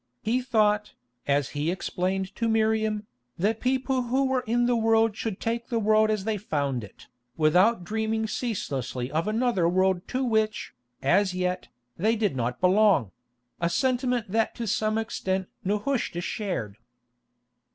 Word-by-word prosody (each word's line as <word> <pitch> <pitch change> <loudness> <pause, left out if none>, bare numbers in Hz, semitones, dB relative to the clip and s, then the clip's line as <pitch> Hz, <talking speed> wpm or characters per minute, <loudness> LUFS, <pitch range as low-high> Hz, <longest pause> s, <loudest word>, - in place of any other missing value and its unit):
He 240 +4 +1
thought, 210 -4 +1 0.3
as 140 -1 +2
he 150 +2 -2
explained 185 +1 -2
to 230 - -1
Miriam, 220 -1 +1 0.3
that 215 +5 0
people 260 0 0
who 255 +3 +1
were 260 -1 0
in 240 +2 +2
the 245 0 +2
world 225 -1 +3
should 215 -3 -4
take 230 +1 -2
the 235 - -1
world 215 0 +3
as 215 -3 0
they 220 0 -1
found 140 - -2
it, 100 - -13 0.3
without 180 +7 +4
dreaming 220 +3 -1
ceaselessly 135 - -3
of 160 +5 -1
another 215 -6 +2
world 185 0 +1
to 260 +1 -1
which, 220 -3 0 0.3
as 185 +7 +3
yet, 180 0 -2 0.3
they 220 +6 +2
did 210 -9 0
not 125 0 -2
belong; 185 - +4 0.5
a 170 - +1
sentiment 245 +2 0
that 225 +1 +1
to 235 - -4
some 215 +1 0
extent 190 -4 -2 0.2
Nehushta 210 -2 -1
shared. 175 - -3
215 Hz, 150 wpm, -26 LUFS, 180-225 Hz, 0.5 s, without